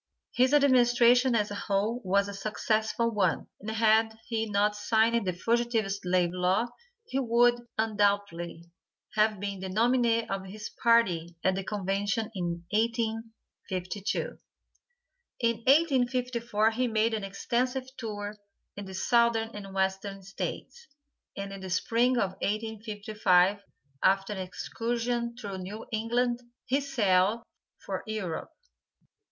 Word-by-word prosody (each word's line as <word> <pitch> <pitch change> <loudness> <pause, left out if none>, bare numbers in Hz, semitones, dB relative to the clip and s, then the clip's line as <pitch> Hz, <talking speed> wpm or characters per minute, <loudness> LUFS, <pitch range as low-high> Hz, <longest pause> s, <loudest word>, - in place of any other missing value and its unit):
His 255 +2 +3
administration, 245 -2 +5
as 210 -2 +1
a 205 - -4
whole, 210 +5 +1
was 200 +1 +2
a 200 - -6
successful 220 +3 0
one, 195 -6 +1
and 210 - -6
had 220 0 +3
he 225 -2 -2
not 210 +1 +2
signed 220 +1 +2
the - - +2
fugitive 230 +2 0
slave 180 -3 +1
law, 185 +6 +1 0.4
he 265 - -2
would, 240 -1 +3
undoubtedly, 205 -6 0 0.5
have 215 -1 +2
been 200 -1 -4
the 190 0 -5
nominee 230 +2 +2
of 195 -1 -3
his 210 +2 -7
party 180 -8 +3
at 190 - +3
the 195 +1 -3
convention 205 +3 -1
in 170 -3 -3
1852. 220 -4 -3 1.0
In 230 -1 +2
1854 245 -5 +2
he 250 +3 0
made 225 0 +1
an 215 -2 -2
extensive 250 +6 -1
tour 210 -4 -5 0.4
in 205 - -7
the 190 0 -8
Southern 235 +2 +2
and 200 -1 -8
Western 195 +1 -2
States, 330 - -6 0.5
and 200 0 -5
in 195 - -7
the 190 0 -7
Spring 235 +7 +2
of 195 -5 +1
1855, 210 -3 +1 0.4
after 195 +2 +2
an 195 - -6
excursion 235 +5 -3
through 200 -5 -6
New 205 +4 -7
England, 240 +2 0 0.2
he 275 +3 +1
sailed 215 -5 +2 0.3
for - - -5
Europe. 200 -7 -4
215 Hz, 125 wpm, -29 LUFS, 195-235 Hz, 1.0 s, administration